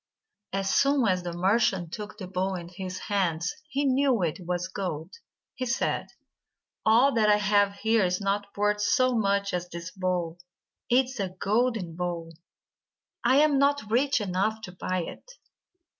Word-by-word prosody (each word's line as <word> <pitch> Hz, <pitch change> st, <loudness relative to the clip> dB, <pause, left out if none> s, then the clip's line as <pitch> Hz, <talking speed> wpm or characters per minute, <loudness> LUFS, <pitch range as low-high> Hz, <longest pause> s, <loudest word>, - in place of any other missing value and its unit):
As 195 Hz, 0 st, -1 dB
soon 275 Hz, -3 st, +3 dB
as 185 Hz, -1 st, +1 dB
the 175 Hz, 0 st, -4 dB
merchant 185 Hz, -1 st, +1 dB
took 210 Hz, 0 st, -7 dB
the 195 Hz, -, -6 dB
bowl 185 Hz, +1 st, -2 dB
in 170 Hz, -1 st, -7 dB
his 185 Hz, 0 st, -6 dB
hands, 175 Hz, -5 st, -1 dB, 0.2 s
he 280 Hz, +2 st, 0 dB
knew 265 Hz, -5 st, +2 dB
it 165 Hz, 0 st, -1 dB
was 180 Hz, 0 st, -1 dB
of 185 Hz, -, -10 dB
gold. 175 Hz, -3 st, -4 dB, 0.4 s
He 255 Hz, -, -4 dB
said: 240 Hz, -, -1 dB, 0.8 s
"All 240 Hz, +6 st, +5 dB
that 215 Hz, -2 st, +3 dB
I 210 Hz, -, +6 dB
have 205 Hz, -1 st, +2 dB
here 220 Hz, +1 st, +2 dB
is 180 Hz, 0 st, 0 dB
not 200 Hz, 0 st, -1 dB
worth 210 Hz, 0 st, +1 dB
so 255 Hz, +4 st, +3 dB
much 200 Hz, -2 st, +1 dB
as 180 Hz, 0 st, -3 dB
this 170 Hz, -1 st, -7 dB
bowl. 180 Hz, -3 st, -2 dB, 0.5 s
It 255 Hz, +2 st, +4 dB
is 260 Hz, -1 st, -9 dB
a 195 Hz, -2 st, -1 dB
golden 210 Hz, 0 st, 0 dB
bowl. 170 Hz, -2 st, -4 dB, 0.9 s
I 260 Hz, -, +4 dB
am 300 Hz, -3 st, +3 dB
not 280 Hz, -6 st, +1 dB
rich 265 Hz, +3 st, +3 dB
enough 210 Hz, +2 st, -1 dB
to 185 Hz, -, -8 dB
buy 185 Hz, 0 st, -2 dB
it." -, -, -10 dB
200 Hz, 170 wpm, -27 LUFS, 180-230 Hz, 0.9 s, I